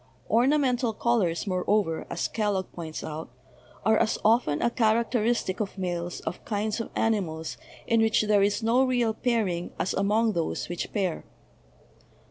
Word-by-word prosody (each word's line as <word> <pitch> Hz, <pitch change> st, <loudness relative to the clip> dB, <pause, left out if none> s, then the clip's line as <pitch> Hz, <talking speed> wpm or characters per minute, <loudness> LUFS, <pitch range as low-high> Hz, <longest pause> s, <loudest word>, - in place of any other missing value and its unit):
"Ornamental 250 Hz, -1 st, +3 dB
colors," 210 Hz, -7 st, +1 dB
moreover, 185 Hz, -2 st, 0 dB
as -, -, -1 dB
Kellogg 205 Hz, -4 st, -1 dB
points 160 Hz, -2 st, -6 dB
out, 155 Hz, +1 st, -6 dB, 0.6 s
"are 220 Hz, 0 st, +4 dB
as 215 Hz, -, +1 dB
often 215 Hz, -10 st, +3 dB
a 235 Hz, -, +1 dB
characteristic 230 Hz, -3 st, +1 dB
of 200 Hz, -2 st, -3 dB
males 175 Hz, -2 st, -3 dB
of 160 Hz, -, -5 dB
kinds 210 Hz, +1 st, -2 dB
of -, -, -6 dB
ani 225 Hz, -1 st, +2 dB
mals 160 Hz, -3 st, -5 dB, 0.3 s
in 230 Hz, -2 st, +3 dB
which 220 Hz, -1 st, +3 dB
there 210 Hz, -1 st, +3 dB
is 205 Hz, +3 st, +1 dB
no 240 Hz, +4 st, +4 dB
real 245 Hz, -4 st, +1 dB
pairing 215 Hz, -8 st, -1 dB
as 185 Hz, -, -1 dB
among 215 Hz, +3 st, +2 dB
those 165 Hz, -2 st, -2 dB
which 175 Hz, -, -4 dB
pair 190 Hz, -5 st, -1 dB
215 Hz, 150 wpm, -27 LUFS, 180-230 Hz, 0.6 s, are